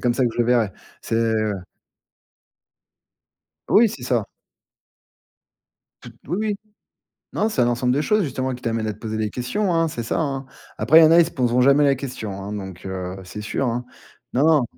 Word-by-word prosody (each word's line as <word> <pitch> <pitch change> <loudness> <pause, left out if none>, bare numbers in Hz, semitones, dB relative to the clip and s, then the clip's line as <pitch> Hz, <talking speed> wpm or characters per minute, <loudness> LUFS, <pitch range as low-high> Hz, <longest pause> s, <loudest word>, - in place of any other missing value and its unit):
comme 120 -1 +1
ça 130 0 +2
que 120 - +1
je - - -9
le 120 - +3
verrai. 115 -5 +2 0.3
C'est 115 0 0 2.4
Oui, 225 +2 +6
c'est 140 - -8
ça. 120 -3 0 1.8
Tout - - -11
Oui, 175 +6 -2
oui. 215 -1 0 0.8
Non, 215 - +1
c'est 130 - 0
un 120 - +3
ensemble 125 +1 +1
de 140 - +1
choses 210 +5 +2
justement 130 -2 -2
qui 125 - -11
t'amènent 115 -1 -1
à - - -1
te 105 - -15
poser 110 -1 -4
des 110 -1 -1
questions, 175 - -1
hein, 165 0 +2
c'est 120 -6 -5
ça, 115 - -2
hein. 135 -3 -2 0.3
Après, 160 - +6
il - - +8
y - - +9
en 155 - +4
a, 170 - +7
ils 170 - +6
se 165 - -6
poseront 125 -1 +1
jamais 140 +3 +5
la 140 -1 +4
question, 130 -6 -6
hein, 100 +1 -6
donc, 95 -3 -7
heu, 95 -1 -5
c'est 105 +4 -8
sûr, 110 +5 -2
hein. 120 +1 -2 0.5
Non, 130 +4 +2
non. 155 -5 +4
125 Hz, 205 wpm, -22 LUFS, 115-145 Hz, 2.4 s, y